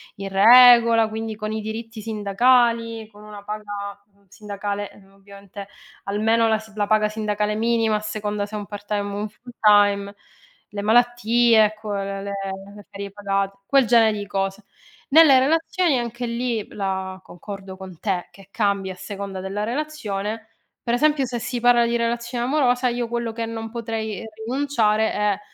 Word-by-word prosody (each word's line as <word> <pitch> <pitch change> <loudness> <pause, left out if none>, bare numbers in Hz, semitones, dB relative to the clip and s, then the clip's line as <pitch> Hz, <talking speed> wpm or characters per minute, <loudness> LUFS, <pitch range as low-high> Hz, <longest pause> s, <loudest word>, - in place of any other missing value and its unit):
in 195 0 -6
regola, 230 +2 +7
quindi 220 0 -5
con 215 0 -5
i 220 - -3
diritti 220 +1 -6
sindacali, 230 +2 +1
con 210 0 -16
una 210 -1 -11
paga, 205 -1 -6
mhmm, 200 0 -31
sindacale, 205 +1 -5
uhm, 195 -1 -20
ovviamente 200 0 -12 0.4
almeno 225 +3 +2
la 220 -1 +2
si 220 0 -13
la 205 -1 -1
paga 215 0 +2
sindacale 210 -1 -2
minima 225 -1 +1
a - - -4
seconda 210 -1 -3
se 215 - -8
è - - -2
un 205 - -7
part-time 205 0 -4
o 200 0 -5
un 210 - -3
full-time, 205 -3 +2 0.5
le 205 -1 -5
malattie, 240 0 +4
ecco, 215 0 -4
le 195 0 -4
le 200 - -5 0.4
le 205 -1 -13
ferie 200 0 -7
pagate, 195 -1 -2
quel 275 -3 +4
genere 220 -2 +4
di 205 - -5
cose. 195 0 -3 0.5
Nelle 300 -2 +7
relazioni 325 +1 +1
anche 240 +1 -4
lì 235 -2 -2
la 190 -1 -3
concordo 190 +1 -9
con 185 -3 -11
te 190 -4 -2
che 195 -1 -17
cambia 200 -3 -1
a - - -14
seconda 195 0 -7
della 195 +2 -4
relazione, 225 -5 -4 0.3
per 235 - 0
esempio, 295 +1 +2
se 240 -1 -4
si 245 +1 -4
parla 240 0 +4
di 235 0 0
relazione 235 +1 -2
amorosa, 255 -2 +2
io 240 0 -2
quello 235 0 -3
che 230 +1 -4
non 225 0 -6
potrei 225 -2 -5 0.2
rinunciare 230 -5 +1
è 210 -1 0
215 Hz, 165 wpm, -22 LUFS, 200-235 Hz, 0.5 s, regola